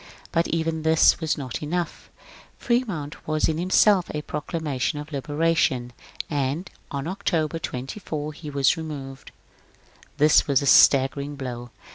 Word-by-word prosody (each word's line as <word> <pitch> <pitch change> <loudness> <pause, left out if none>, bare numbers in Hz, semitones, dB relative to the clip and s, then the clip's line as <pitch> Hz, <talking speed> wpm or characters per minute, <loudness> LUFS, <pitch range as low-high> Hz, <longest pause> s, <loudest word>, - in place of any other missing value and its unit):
But 165 0 +1
even 160 -1 -1
this 160 0 +4
was 160 -2 -1
not 130 -5 -5
enough; 170 +3 -4 0.5
Fremont 205 - -2
was 155 0 +1
in 160 0 -1
himself 185 +1 +4
a 150 - -3
proclamation 150 -2 -3
of 150 +1 -7
liberation, 145 -4 0 0.3
and 145 +4 -2 0.2
on 140 -1 -4
October 165 -4 -1
24 150 +2 -5
he 150 0 -9
was 140 +3 +2
removed. 140 -4 -7 0.9
This 150 +1 +5
was 140 -3 +3
a - - -2
staggering 140 +1 +4
blow. 120 -3 -6
150 Hz, 130 wpm, -24 LUFS, 140-165 Hz, 0.9 s, This